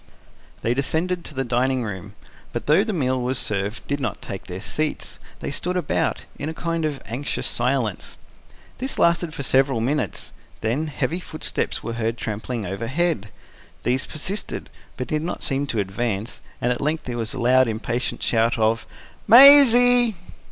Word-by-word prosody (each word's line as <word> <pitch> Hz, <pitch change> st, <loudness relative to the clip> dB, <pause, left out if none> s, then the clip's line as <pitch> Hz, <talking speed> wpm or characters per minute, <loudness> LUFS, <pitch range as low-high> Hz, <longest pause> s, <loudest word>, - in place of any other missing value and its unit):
They 115 Hz, -, +2 dB
descended 165 Hz, +7 st, -1 dB
to 150 Hz, -, -10 dB
the 135 Hz, -, 0 dB
dining 125 Hz, +1 st, 0 dB
room, 100 Hz, -1 st, -7 dB, 0.4 s
but -, -, -4 dB
though 155 Hz, +7 st, +4 dB
the 220 Hz, -, -2 dB
meal 130 Hz, -8 st, 0 dB
was 125 Hz, +1 st, -1 dB
served, 100 Hz, 0 st, -1 dB
did 145 Hz, 0 st, -2 dB
not 120 Hz, -7 st, -3 dB
take 95 Hz, -, -7 dB
their 90 Hz, 0 st, -6 dB
seats: 155 Hz, +9 st, -3 dB, 0.2 s
they -, -, -3 dB
stood 180 Hz, +5 st, -2 dB
about, 170 Hz, -5 st, -1 dB
in 145 Hz, -, -3 dB
a 160 Hz, -, -6 dB
kind 165 Hz, -1 st, -2 dB
of 145 Hz, -3 st, -3 dB
anxious 130 Hz, +5 st, -4 dB
silence. 120 Hz, -5 st, -1 dB, 0.6 s
This 265 Hz, +1 st, -1 dB
lasted 170 Hz, -1 st, +2 dB
for 145 Hz, -, -6 dB
several 135 Hz, -2 st, +2 dB
minutes; 140 Hz, +7 st, -2 dB, 0.3 s
then, 130 Hz, +9 st, -1 dB
heavy 155 Hz, +4 st, -2 dB
footsteps 155 Hz, -3 st, -3 dB
were 115 Hz, -, -4 dB
heard 115 Hz, 0 st, -2 dB
trampling 110 Hz, +1 st, -4 dB
overhead: 115 Hz, -, -1 dB, 0.5 s
these 130 Hz, +2 st, 0 dB
persisted, 190 Hz, +7 st, -4 dB, 0.3 s
but 125 Hz, -, -3 dB
did 150 Hz, +4 st, -1 dB
not 170 Hz, +2 st, -4 dB
seem 140 Hz, +1 st, 0 dB
to 115 Hz, -, -3 dB
advance, 105 Hz, +2 st, -2 dB, 0.2 s
and 120 Hz, -, +1 dB
at 120 Hz, -, -2 dB
length 155 Hz, +3 st, -1 dB
there 120 Hz, -1 st, -5 dB
was 115 Hz, +2 st, -2 dB
a -, -, -5 dB
loud, 130 Hz, +1 st, +4 dB
impatient 115 Hz, +2 st, -3 dB
shout 115 Hz, 0 st, +2 dB
of: 110 Hz, 0 st, +1 dB, 0.4 s
"Maisie!" 245 Hz, -2 st, +8 dB
130 Hz, 165 wpm, -23 LUFS, 115-160 Hz, 0.6 s, Maisie